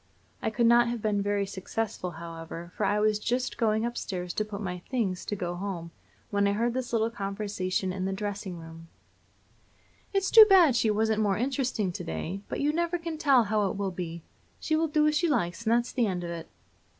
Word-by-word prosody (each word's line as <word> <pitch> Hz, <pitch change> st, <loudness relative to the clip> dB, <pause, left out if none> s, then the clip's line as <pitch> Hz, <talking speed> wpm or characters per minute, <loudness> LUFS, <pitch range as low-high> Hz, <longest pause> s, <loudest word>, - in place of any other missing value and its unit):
I -, -, 0 dB
could 235 Hz, +2 st, +1 dB
not 240 Hz, +1 st, +6 dB
have 235 Hz, 0 st, -2 dB
been 210 Hz, -2 st, 0 dB
very 200 Hz, 0 st, 0 dB
successful, 195 Hz, 0 st, -4 dB
however, 165 Hz, +1 st, -8 dB
for -, -, 0 dB
I 210 Hz, -, +2 dB
was 210 Hz, 0 st, +2 dB
just 245 Hz, +4 st, -1 dB
going 220 Hz, -1 st, +2 dB
up 240 Hz, 0 st, -3 dB
stairs 180 Hz, -2 st, -4 dB
to 215 Hz, -, 0 dB
put 210 Hz, -1 st, -8 dB
on 210 Hz, -, -6 dB
my 180 Hz, -2 st, -4 dB
"things" 210 Hz, -8 st, -1 dB
to 205 Hz, -, -2 dB
go 175 Hz, -3 st, -3 dB
home, 175 Hz, -2 st, -5 dB, 0.4 s
when 200 Hz, -1 st, +2 dB
I 200 Hz, -, +2 dB
heard 230 Hz, +3 st, 0 dB
this 255 Hz, 0 st, -3 dB
little 225 Hz, -1 st, +1 dB
conversation 195 Hz, -3 st, -2 dB
in 185 Hz, 0 st, -3 dB
the 195 Hz, -, -1 dB
dressing 200 Hz, -2 st, -4 dB
room: 165 Hz, 0 st, -11 dB, 1.2 s
"It's 390 Hz, -2 st, 0 dB
too 440 Hz, -2 st, +10 dB
bad 350 Hz, -9 st, +7 dB
she 225 Hz, -, +2 dB
wasn't 220 Hz, +1 st, +1 dB
more 200 Hz, -2 st, +2 dB
interesting 250 Hz, -5 st, -1 dB
to -, -, -6 dB
day, 160 Hz, -, -4 dB
but -, -, -3 dB
you 295 Hz, +1 st, +2 dB
never 340 Hz, +1 st, 0 dB
can 330 Hz, -2 st, -5 dB
tell 275 Hz, -6 st, +5 dB
how 210 Hz, -2 st, +1 dB
it -, -, -4 dB
will 200 Hz, -1 st, -1 dB
be. 170 Hz, -2 st, -6 dB, 0.4 s
She 315 Hz, -, 0 dB
will 325 Hz, +1 st, +2 dB
do 300 Hz, 0 st, +2 dB
as 305 Hz, 0 st, +3 dB
she 340 Hz, +2 st, +2 dB
likes, 230 Hz, -, -1 dB
and 220 Hz, -, +2 dB
that's 240 Hz, +1 st, +1 dB
the 240 Hz, -3 st, +1 dB
end 180 Hz, -2 st, -2 dB
of 170 Hz, -, -4 dB
it." 165 Hz, -1 st, -6 dB
210 Hz, 220 wpm, -28 LUFS, 185-240 Hz, 1.2 s, too